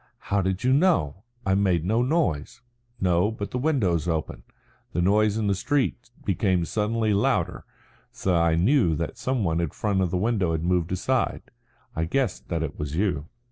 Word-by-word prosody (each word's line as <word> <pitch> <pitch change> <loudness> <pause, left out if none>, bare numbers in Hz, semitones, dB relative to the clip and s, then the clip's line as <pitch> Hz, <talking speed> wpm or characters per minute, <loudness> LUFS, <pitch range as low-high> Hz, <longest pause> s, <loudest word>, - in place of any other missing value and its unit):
"How 100 0 +3
did 95 +3 -2
you 130 +1 +3
know? 135 - +2 0.3
I 95 - +2
made 95 -4 +2
no 110 +5 +2
noise." 125 - 0 0.4
"No, 90 +2 +2
but 105 -2 -5
the 125 - -2
window's 105 - +1
open. 80 -3 -2 0.5
The 85 - 0
noise 105 +2 +3
in 110 - -1
the 100 - +2
street 125 +4 -1 0.2
became 95 -2 +1
suddenly 110 +2 0
louder, 100 - 0 0.5
so 95 -2 -1
I 85 -1 +3
knew 90 - +3
that - - -4
some 130 -3 -1
one 80 -2 0
in 85 -3 0
front 100 +4 -1
of 90 - +1
the 90 - -1
window 100 -4 +1
had 80 0 -2
moved 90 -1 0
aside. 95 - 0 0.5
I 80 - 0
guessed 120 +4 -1
that 85 -2 -1
it 75 -2 -5
was 75 0 -4
you." 85 -6 0
95 Hz, 180 wpm, -25 LUFS, 85-110 Hz, 0.5 s, How